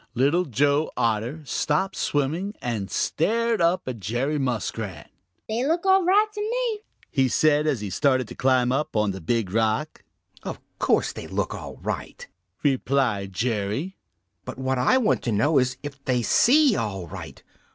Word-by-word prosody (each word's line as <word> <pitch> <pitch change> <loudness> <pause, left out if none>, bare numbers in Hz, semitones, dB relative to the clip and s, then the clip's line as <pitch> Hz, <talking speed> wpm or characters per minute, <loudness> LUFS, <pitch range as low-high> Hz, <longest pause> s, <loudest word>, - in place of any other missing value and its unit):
Little 145 +9 +2
Joe 145 +3 +1
Otter 115 +7 0
stopped 150 +7 0
swimming 160 +9 -1
and 110 -5 -3
stared 230 +5 0
up 170 -1 +2
at 125 -3 -4
Jerry 125 +9 -1
Muskrat. 110 - -3 0.4
"They 225 +3 -1
look 335 +4 0
all 380 0 +5
right 395 +4 +5
to 420 - -4 0.7
me," 135 -1 +3
said 150 +3 +3
he, - - +4
as 125 -7 -3
he 100 -2 -4
started 130 -2 +2
to - - -7
climb 130 -1 +2
up 140 0 -1
on 105 -2 +2
the 95 0 -7
Big 105 +2 -1
Rock. 110 +7 0 0.4
"Of - - -6 0.2
course - - +2
they - - -8
look - - -2
all - - -8
right," - - -5 0.4
replied 130 -8 +1
Jerry, 115 - -2 0.5
"but - - -7
what 130 0 -1
I 130 - +4
want 235 -5 +2
to 120 - 0
know 135 +8 +3
is 125 -1 0
if 140 -1 -8
they 125 -2 +1
see 270 - +5
all 95 -5 -3
right. 80 - -9
135 Hz, 165 wpm, -24 LUFS, 115-165 Hz, 0.7 s, all